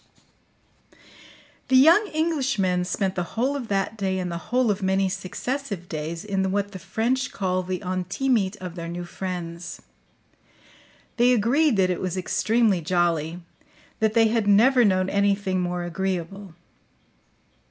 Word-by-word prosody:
The 260 - +2
young 340 +10 +6
Englishmen 265 - 0
spent 190 +1 -1
the 180 - -2 0.2
whole 260 +5 +1
of 260 -5 -4
that 200 +2 -1
day 190 -1 -1
and 180 -1 -3
the 170 - -4
whole 250 -1 +2
of 205 0 -3
many 190 0 +1
successive 200 +1 -4
days 160 +3 -5
in 190 -2 -1
what 200 0 -1
the 190 - -8
French 250 +7 -1
call 185 -2 -1
the 185 +1 -4
intimite 190 +3 -1
of 180 -2 -7
their 170 -1 -6
new 175 +1 -5
friends. 170 -2 -6 1.4
They 245 +1 +5
agreed 250 +4 +2
that 185 -1 +3
it 180 - -3
was 185 0 -3
extremely 215 +1 +1
jolly, 170 0 0 0.6
that 220 0 +1
they 225 -1 +5
had 225 -2 0
never 240 +5 +5
known 185 -3 +2
anything 200 -1 +1
more 175 0 -2
agreeable. 185 +1 -4
195 Hz, 140 wpm, -24 LUFS, 180-225 Hz, 1.4 s, young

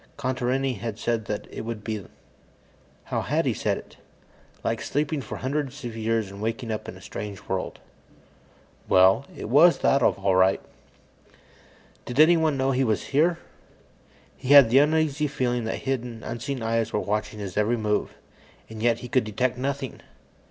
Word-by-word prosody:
Contarini 130 -2 -1
had 115 0 -4
said 115 -2 -1
that 105 -2 -4
it - - -6
would 110 -2 -5
be... 110 -2 -4 1.0
how - - -2
had - - 0
he - - +1
said - - -1
it? - - -13 0.7
"Like - - -1
sleeping 145 0 -1
for 115 - -7
hundreds 140 0 -3
of 115 -2 -5
years 110 -2 -1
and 100 +1 -10
waking 115 +2 -3
up 110 0 -4
in - - -9
a - - -15
strange 100 -1 -7
world." 95 -1 -3 1.1
Well, 95 +8 +5
it - - -5
was 155 +9 +6
that, 135 - +3
all 100 -4 +2
right. 95 +1 +4 1.5
Did 125 +3 -4
anyone 160 -2 +5
know 135 0 +1
he 135 0 +1
was 110 -7 0
here? 165 +4 +3 1.0
He - - -9
had 140 -6 +9
the 135 - +7
uneasy 150 0 +2
feeling 125 -4 -1
that 110 - -4
hidden, 125 -4 -3
unseen 125 +1 -4
eyes 115 0 0
were - - 0
watching 105 +1 -2
his 100 -3 -6
every 105 +3 +2
move, 105 -1 -1 0.6
and 110 -1 -7
yet 115 0 +2
he 125 - -6
could 130 -1 +2
detect 120 +4 -1
nothing. 135 +1 -4
120 Hz, 165 wpm, -25 LUFS, 110-135 Hz, 1.5 s, had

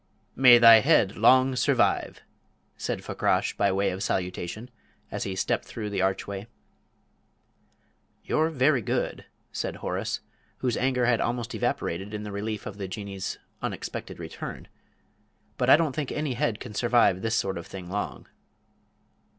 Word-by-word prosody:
"May 125 -2 +8
thy 115 -1 +9
head 130 -6 +3
long 130 +4 +5
survive!" - - +1 0.5
said - - -4
Fakrash, - - 0
by 100 -1 +2
way 100 +1 +1
of 95 +1 -5
salutation, 95 +4 -3 0.4
as - - -3
he 95 - -3
stepped - - -1
through 105 -2 -6
the 100 -2 -1
archway. 95 +2 -2 1.8
"You're 160 +1 +1
very 135 -3 +2
good," - - -2 0.3
said - - -3
Horace, - - -3 0.4
whose 125 -3 -1
anger 125 -1 +1
had 120 -1 +2
almost 120 -1 -2
evaporated 95 +5 -2
in 105 - -5
the 105 - -6
relief 105 +1 -4
of 105 -1 -7
the 95 - -4
Jinnee's 95 -1 -5 0.2
unexpected - - -5
return, - - -8 0.9
"but 125 - +1
I 145 - +9
don't 155 -5 -1
think 150 -4 -3
any 150 -3 -2
head 115 -2 -1
can 120 -4 -8
survive 115 -5 +3
this 115 0 0
sort 95 -4 -1
of 85 - -10
thing 95 -2 -8
long." 100 +3 -4
110 Hz, 150 wpm, -26 LUFS, 100-125 Hz, 1.8 s, thy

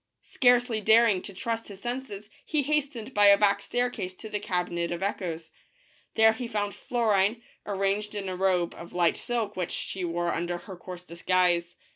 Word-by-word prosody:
Scarcely 245 -3 +3
daring 220 -2 +5
to 200 - -8
trust 230 +3 -4
his 200 -2 -10
THE 240 - -3
BLUE 245 - 0
BIRD. 265 - -14
senses 205 -1 -9
he 305 -2 0
hastened 275 -4 -2
by 205 -1 +6
a 200 0 +8
back 200 -1 +3
staircase 225 -5 -2
to 220 - -9
the 210 - -1
Cabinet 175 -3 -2
of 175 +2 -3
Echoes. 170 -5 -3 0.6
I - - -7
here 220 0 +7
he 240 +1 -5
found 205 -3 -2
Florine, 225 -1 +1 0.2
arrayed 200 +1 -1
in 200 -2 -4
a 185 - -3
robe 180 -2 +1
of 170 - -11
light 175 -2 +3
silk 235 -4 -3
which 180 -2 -2
she 190 - -4
wore 175 0 -1
under 175 +1 -2
her 185 +2 -10
coarse 180 0 -9
disguise. 175 0 +1
200 Hz, 195 wpm, -27 LUFS, 180-225 Hz, 0.6 s, a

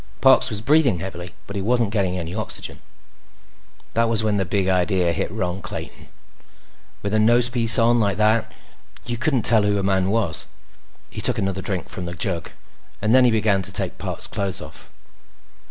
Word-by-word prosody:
Parks 130 -1 +5
was 105 -3 -2
breathing 135 - +3
heavily, 90 0 -7
but 100 - -9
he 100 - -2
wasn't 115 0 +1
getting 95 -4 0
any 85 -1 -5
oxygen. 110 0 -2 1.1
That 115 0 +1
was 115 -1 +2
when 105 -1 +1
the 95 - 0
Big 95 +1 0
Idea 90 -1 +1
hit - - -2
Ron 95 -3 -3
Clayton. 90 - -8 1.0
With 100 +1 -2
a 110 - +3
nosepiece 120 +1 +3
on 120 +1 +3
like 100 -3 +1
that, 110 +1 +2 0.5
you 120 -1 -4
couldn't 135 -4 +1
tell 110 -2 +4
who 105 0 +1
a 100 - -1
man 95 -1 +1
was. 100 -7 -1 0.6
He - - -5
took - - +1
another 95 0 -2
drink 95 -3 -3
from 90 - -6
the 85 0 -6
jug 85 -1 -3 0.5
and 110 +2 +1
then 130 -1 +6
began 105 -3 +2
to - - -2
take - - -1
Parks' - - -3
clothes 95 -2 -3
off. - - -11
105 Hz, 180 wpm, -22 LUFS, 95-115 Hz, 1.1 s, then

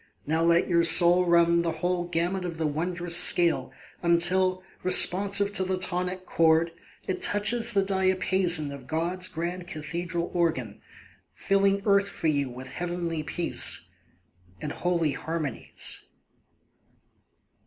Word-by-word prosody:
Now 160 +2 -1
let 170 +1 +2
your 170 -2 +2
soul 175 +2 +5
run 170 0 +3
the 165 -1 -2
whole 175 +2 -2
gamut 175 +2 -2
of 170 -2 -6
the 160 - -2
wondrous 170 +3 -1
scale 175 -1 +3 0.3
Until, 185 +2 +2 0.2
responsive 200 +2 +5
to 190 - 0
the 185 0 -2
tonic 185 0 -3
chord, 165 0 +2 0.4
It 185 - -3
touches 230 +3 +1
the 195 -1 +2
diapason 185 -4 +1
of 140 -2 -11
God's 175 +4 -2
grand 175 +2 -6
cathedral 170 +3 -5
organ, 155 - -2 0.5
Filling 195 0 0
earth 200 -1 +2
for - - -9
you 140 -3 -1
with 125 +1 -10
heavenly 175 -2 -4
peace 165 +3 -1 0.7
And 150 - -5
holy 170 -3 -1
harmonies. 155 -2 -5
175 Hz, 125 wpm, -26 LUFS, 165-185 Hz, 0.7 s, soul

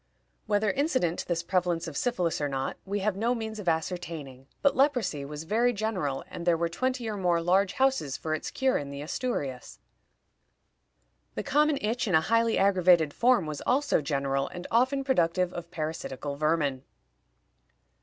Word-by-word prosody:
Whether 205 -1 +2
incident 255 - 0
to - - -5
this 170 -1 -1
prevalence 175 -1 0
of 160 - -7
syphilis 180 - 0
or 145 - 0
not, 135 -1 -2
we 200 +1 -2
have 205 0 0
no 230 +5 +1
means 220 -2 -5
of 185 -4 0
ascertaining, 160 -5 -4 0.2
but 280 - +4
leprosy 250 - +1
was 150 +2 -6
very 230 +8 +2
general, 195 - -2
and - - -7
there 170 -1 +3
were 170 0 0
twenty 255 +6 -2
or 215 - -2
more 175 -3 +2
large 185 +3 +2
houses 265 - +1
for 155 - -3
its 155 - -3
cure 265 -1 +1
in 140 - -6
the 140 +1 -6
Asturias. 145 - -4 1.6
The - - -3
common 300 +1 +2
itch 230 +3 -1
in 185 - +2
a 160 - +5
highly 230 +5 +2
aggravated 180 -6 +4
form 240 -6 +3
was 150 -1 -5
also 275 - +2
general, 140 -1 -1
and 180 0 -8
often 260 +4 +2
productive 180 -8 +1
of 170 -1 -7
parasitical 155 -4 -4
vermin. 145 -3 0
180 Hz, 170 wpm, -28 LUFS, 155-230 Hz, 1.6 s, a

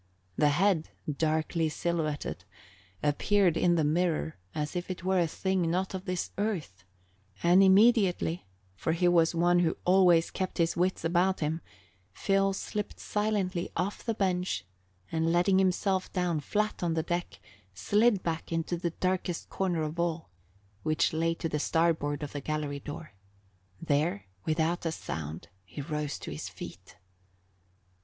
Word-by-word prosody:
The 150 - +4
head, 170 +1 +2 0.3
darkly 160 +1 0
silhouetted, 155 -2 -2 0.6
appeared 175 +4 +3
in 175 0 +3
the 160 - +2
mirror 160 0 +1 0.2
as 150 +3 -3
if 175 +1 -3
it 185 -2 -5
were 190 0 +2
a 170 - +3
thing 185 0 0
not 185 +3 -1
of 190 0 -5
this 180 -2 -2
earth, 170 - -2 0.6
and 175 +3 +6
immediately, 190 - +4 0.3
for 160 +11 -1
he 175 +2 +2
was 170 -1 +4
one 175 +1 +4
who 165 -2 +1
always 180 -3 +5
kept 185 -1 -3
his 165 -1 +2
wits 180 -1 0
about 180 +3 +2
him, 160 +2 -1 0.5
Phil 195 - +2
slipped 210 +1 -4
silently 205 -4 -1
off 185 +4 -2
the 225 -2 -1
bench, 180 - 0 0.5
and 165 0 +1
letting 180 +3 +4
himself 190 0 +1
down 180 -4 0
flat 210 +8 -1
on 170 -2 0
the 160 - 0
deck, 175 +1 -3 0.4
slid 210 - +3
back 165 0 -3
into 165 +1 -1
the 170 0 -1
darkest 185 0 -2
corner 175 -4 0
of 155 +2 -4
all, 165 - -1 0.5
which 155 +7 +1
lay 165 +1 +1
to 165 - -3
the 150 -1 -2
starboard 155 -2 +1
of 145 - -5
the 145 - -5
gallery 150 -1 -3
door. 150 0 -8 0.7
There, 165 +5 0 0.2
without 160 +2 +1
a 165 - 0
sound, 80 - -6
he 95 +9 -10
rose 150 0 -3
to - - -6
his 75 - -5
feet. - - -10
170 Hz, 150 wpm, -29 LUFS, 155-185 Hz, 0.7 s, and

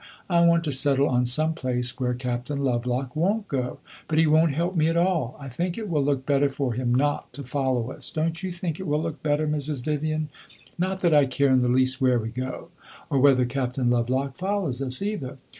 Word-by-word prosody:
I 170 - +4
want 170 0 +4
to 155 - -2
settle 140 +1 +3
on 125 -2 +1
some 155 +6 +4
place 125 -5 -2
where 125 -1 0
Captain 125 +3 -3
Lovelock 125 -1 -1
won't 200 +7 0
go, 125 -3 -3 0.3
but 155 - -1
he 160 - +5
won't 155 +1 +4
help 170 +5 -1
me 155 -1 +3
at 165 +1 +1
all. 170 -8 0
I 140 - -8
think 170 +7 -3
it 220 -2 -4
will 155 -6 +1
look 135 -2 0
better 140 0 +2
for 135 -3 -2
him 120 +1 -1
not 145 +3 0
to 140 - -7
follow 130 -2 -1
us; - - -4
don't 160 +2 -2
you 190 -1 -3
think 175 -2 -4
it 190 - -5
will 150 +1 0
look 165 -1 -5
better, 150 0 0
Mrs. 150 -3 -1
Vivian? 155 0 -1 0.5
Not 185 +1 -2
that 170 -3 +3
I 145 -2 +5
care 135 +1 +1
in 130 - +5
the 125 - +1
least 130 +2 +2
where 130 -2 +4
we 115 -1 -3
go 130 +7 -6 0.4
or 140 - +2
whether 130 -2 +5
Captain 125 -1 -1
Lovelock 130 +3 0
follows 185 -9 -2
us, 130 +5 -1
either. 145 -11 -4
140 Hz, 220 wpm, -25 LUFS, 130-160 Hz, 0.5 s, he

